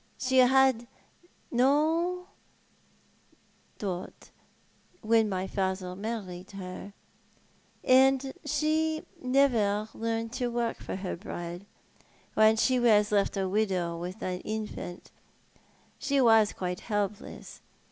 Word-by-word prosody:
She 260 0 +2
had 260 -2 +4 0.6
no 315 +8 +2 1.5
dot 185 -3 -6 0.7
when 225 -1 +3
my 185 -1 -2
father 190 -1 -2
married 195 -3 -5
her, 195 +1 -8 0.9
and 265 +1 +4
she 310 +2 +1
had 310 - -8 0.2
never 230 -6 +2
learnt 225 0 -3
to 255 -1 -1
work 235 -1 -1
for - - -5
her 190 -1 -4
bread. 175 0 -7 0.7
When 215 0 +5
she 255 +3 +2
was 210 -3 +4
left 200 0 +1
a 190 -1 0
widow 185 -4 0
with 180 +4 -6
an 180 -1 -2
infant 215 -4 -6 0.9
she 280 0 +1
was 225 -4 +5
quite 180 -1 -4
helpless. 205 -2 -4
220 Hz, 105 wpm, -29 LUFS, 190-260 Hz, 1.5 s, When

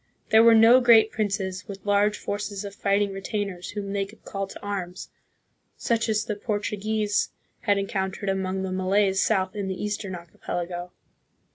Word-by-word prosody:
There 220 0 +7
were 230 0 +7
no 230 +3 +7
great 225 -3 +6
princes, 195 -3 -2
with 195 -1 -9
large 205 +1 +3
forces 205 0 -4
of 200 - -7
fighting 200 0 +1
re 195 - -6
tainers 195 -3 -4
whom 200 -1 -4
they 200 -1 0
could 205 +3 -13
call 195 -1 -3
to - - -10
arms, 185 -3 -5 0.7
such 230 -1 0
as 215 0 +1
the 220 - -2
Portu 205 0 -3
140 - - -12
THE - - -12
PHILIPPINES. 215 0 -1
guese 205 - +2 0.4
had 205 -1 +4
encountered 195 0 -2
among 190 0 -1
the 190 - -3
Malays 190 +1 +2
south 190 -3 +1
in 200 -2 -3
the 190 -1 -4
Eastern 205 -2 -3
Archipelago. 175 +1 -5
200 Hz, 185 wpm, -25 LUFS, 190-210 Hz, 0.7 s, There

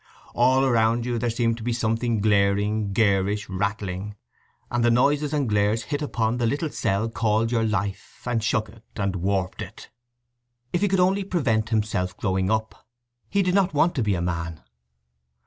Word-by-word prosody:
All 130 +2 +3
around 115 -1 +2
you 120 -1 -1
there 120 - 0
seemed 115 0 0
to 115 - -8
be 120 +1 -1
something 115 -1 0
glaring, 100 0 +2
garish, 100 -1 +1
rattling, 100 0 -3 0.6
and 120 -1 +1
the 120 - +4
noises 145 +5 +2
and 145 -4 0
glares 105 +2 +1
hit 145 -1 -3
upon 115 -5 -1
the 120 - +2
little 145 +5 -1
cell 100 +4 0
called 115 0 0
your 115 -2 +1
life, 100 -3 -3
and 120 -3 -1
shook 110 0 +1
it, 115 -1 -17
and 100 -2 -1
warped 95 0 -1
it. - - -9 0.8
If 175 - +1
he 205 - +3
could 195 -1 +1
only 190 +2 +3
prevent 125 - 0
himself 105 -5 -1
growing 95 -1 0
up! 110 0 -2 0.4
He 200 -1 +2
did 180 -1 +1
not 190 -4 +2
want 165 +4 +3
to 135 - -1
be 105 -3 +1
a 85 - -2
man. 85 -2 -3
110 Hz, 180 wpm, -24 LUFS, 100-125 Hz, 0.8 s, the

